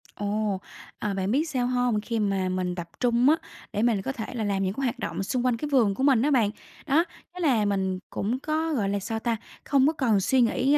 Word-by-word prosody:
Ồ! 205 -1 -1 0.4
À, 205 -1 -1
bạn 195 +1 -1
biết 305 +5 +1
sao 250 -4 0
hông? 245 -4 +1
Khi 230 0 -2
mà 195 -3 0
mình 185 -1 -1
tập 170 -1 -6
trung 245 +2 +3
á 315 - +6 0.4
để 210 - 0
mình 225 -5 +2
có 265 - -3
thể 230 -5 -5
là 230 -3 -2
làm 195 -1 0
những 190 +1 0
cái 275 - -4
hoạt 245 - -1
động - - -3
xung 250 +4 -1
quanh 245 -2 +2
cái 300 - -4
vườn 230 -8 +3
của 265 - -2
mình 265 -5 +5
á 295 +2 +2
bạn, 230 -6 +4 0.4
đó, 310 +5 +4 0.3
thế 360 - -9
là 255 -11 +3
mình 190 -2 0
cũng 235 +6 -2
có, 315 +2 -1
gọi 205 -7 0
là, 200 0 0
sao 220 +3 -3
ta 230 0 -1 0.3
không 275 0 +3
có 315 - +2
còn 235 -9 +2
suy 250 +7 +3
nghĩ 265 +5 +3
230 Hz, 250 wpm, -26 LUFS, 200-265 Hz, 0.4 s, á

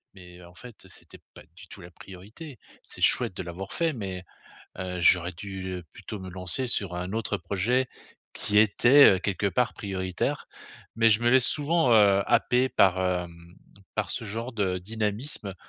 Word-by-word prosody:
«Mais 90 -2 -14
mais - - -14
en 85 - -17
fait, 110 -2 -13
c'était - - -12 0.2
pas - - -12
du 90 +1 -14
tout 95 - -12
la 85 - -12
priorité». 105 - -12 0.3
C'est - - -12
chouette - - +2
de - - -4
l'avoir 90 +3 -7
fait, 165 -2 0
mais 95 -6 -6 0.6
heu 90 -1 -4
j'aurais 90 +1 +3
dû, 95 +1 -7
heu, 90 - -11
plutôt 105 -3 -9
me 95 - -8
lancer 90 +8 -3
sur 100 -6 -2
un 90 +2 -5
autre 105 -2 -2
projet, 100 +9 -1 0.5
qui 105 - 0
était, 120 +6 +6
heu, - - -4
quelque 100 0 -2
part 115 +5 0
prioritaire, 95 -2 -3 0.5
mais 115 0 +5
je 110 +2 +2
me 120 - +3
laisse 130 -1 +4
souvent, 150 -3 +2
heu, 100 -2 +5
happer 125 +1 +2
par, 95 -6 +3
hem, 85 -2 -4 0.4
par 105 -4 -1
ce 120 - -4
genre 115 +4 -5
de 95 -5 -1
dynamisme, 105 - -3
100 Hz, 180 wpm, -26 LUFS, 90-115 Hz, 0.6 s, était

